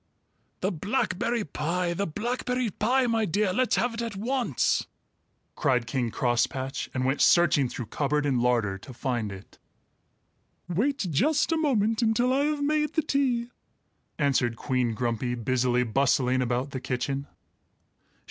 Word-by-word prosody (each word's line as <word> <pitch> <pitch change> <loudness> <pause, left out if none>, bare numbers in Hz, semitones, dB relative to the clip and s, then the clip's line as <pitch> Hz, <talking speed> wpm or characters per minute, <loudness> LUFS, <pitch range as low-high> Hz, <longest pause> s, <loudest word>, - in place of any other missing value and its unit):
"The 190 - +1
blackberry 210 - -1
pie! 170 +3 -2
The 200 +3 -2
blackberry 245 +5 -2
pie! 250 +7 +1
My 230 -2 +1
dear, 200 +1 +1
let's 255 -1 +2
have 245 -1 0
it 230 - -4
at 230 -3 -4
once!" 230 - 0 0.7
cried 125 -4 +1
King 120 0 -1
Crosspatch, 130 +3 -1
and 130 -1 -2
went 135 +2 0
searching 165 -6 +4
through 120 - -5
cupboard 145 +5 -1
and 130 -4 +1
larder 115 -6 +1
to 130 +6 -11
find 120 -5 -2
it. 95 0 -12 1.1
"Wait 220 - 0
just 295 - +2
a 325 - +2
moment 225 -7 +1
until 240 +3 +2
I 280 +2 +2
have 300 -1 -1
made 300 +1 +1
the 315 - +1
tea," 250 -5 0 0.7
answered 130 -5 +1
Queen 125 -3 -1
Grumpy, 120 +1 -1
busily 125 +1 +1
bustling 130 +1 +2
about 125 +3 -1
the 130 - -5
kitchen. 135 +2 -2
155 Hz, 145 wpm, -27 LUFS, -, 1.1 s, searching